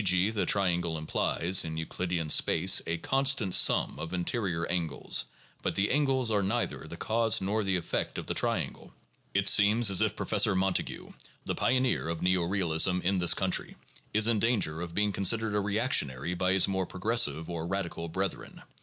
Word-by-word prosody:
g., 95 +2 +2
the 105 -3 -2
triangle 85 -4 0
implies 85 +3 -1
[in 80 -1 -6
Euclidean 85 +1 -3
space] 90 +4 +3
a 85 +1 -2
constant 135 -2 +1
sum - - +3
of 85 - -6
interior 90 -2 -2
angles; 80 -8 -1 0.4
but - - -2
the 100 +1 0
angles 135 -4 +1
are 105 -2 +1
neither 110 +5 -2
the - - -9
cause 110 -1 +1
nor 105 +3 -1
the 95 -1 0
effect 90 - -3
of - - -5
the - - -2
triangle - - -2 0.4
(p. - - +2
485). - - -5
It - - -7
seems 105 +1 +5
as 95 - +4
if 110 -1 +1
Professor 105 -1 +1
Montague, 95 0 -2 0.3
the - - -2
pioneer 130 -8 0
of 85 -1 -4
neo 90 -1 +1
realism 90 -1 +1
in 95 +1 0
this 85 -1 +4
country, - - -1 0.4
is 110 +1 +3
in 115 -2 +2
danger 100 -9 0
of 85 -1 -6
being 105 0 +1
considered 110 +3 +1
a 105 - +1
reac 105 +5 -1
tionary 70 +5 0
by 95 +1 0
his 95 - +3
more 95 -2 -2
progressive 90 -6 0
or 85 -1 -5
radical 85 -3 -4
brethren. 95 +2 -5
95 Hz, 185 wpm, -28 LUFS, 85-105 Hz, 0.4 s, seems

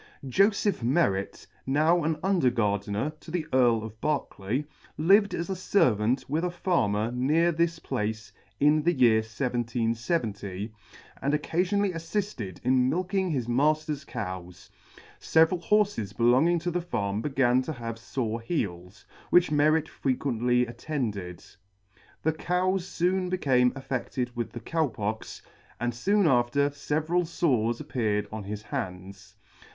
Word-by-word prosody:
JOSEPH 200 - +2
MERRET, 115 - 0 0.2
now 155 +5 +3
an 155 0 0
Under 185 -9 +3
Gardener 105 +3 -1
to - - -13
the 165 -1 -2
Earl 120 -4 +4
of 110 0 -9
Berkeley, 135 -3 -2 0.3
lived 195 +4 +4
as 170 - -3
a 190 - -2
Servant 125 - +2
with 155 +5 -1
a 180 - +1
Farmer 120 - 0
near 150 +8 +2
this 170 0 0
place 110 -3 -4 0.3
in 150 +2 +4
the 175 +3 +2
year 120 -6 +5
1770, 115 - -2 0.5
and 140 +2 +1
occafionally 180 +6 0
affifted 165 - -4
in 130 0 +3
milking 185 +3 0
his 130 -7 -1
matter's 150 +3 +1
cows. 90 -9 -7 0.5
Several 160 +2 +3
horfes 195 - +1
belonging 130 +9 +4
to 175 +2 -2
the 180 +1 -1
farm 105 - -2
began 130 -2 +2
to 155 +5 -4
have 115 -3 -6
fore 115 -1 -3
heels, 95 - -4 0.2
which 175 -3 +4
Merret 155 +1 +3
frequently 125 -2 0
attended. 115 - -4 0.8
The 160 - +2
cows 180 +3 0
foon 180 +1 +1
beca/ne 130 -9 +3
affe&ed 125 -2 -3
with 120 -2 -4
the 120 - -7
Cow 160 +5 0
Pox, 110 -2 -5 0.4
and 120 0 -1
foon 200 - +2
after 135 +2 +2
feveral 155 +5 0
fores 125 -9 0
appeared 110 -8 -1
on 110 -2 -6
his 105 +1 -5
hands. 95 +1 -6
130 Hz, 135 wpm, -27 LUFS, 110-165 Hz, 0.8 s, year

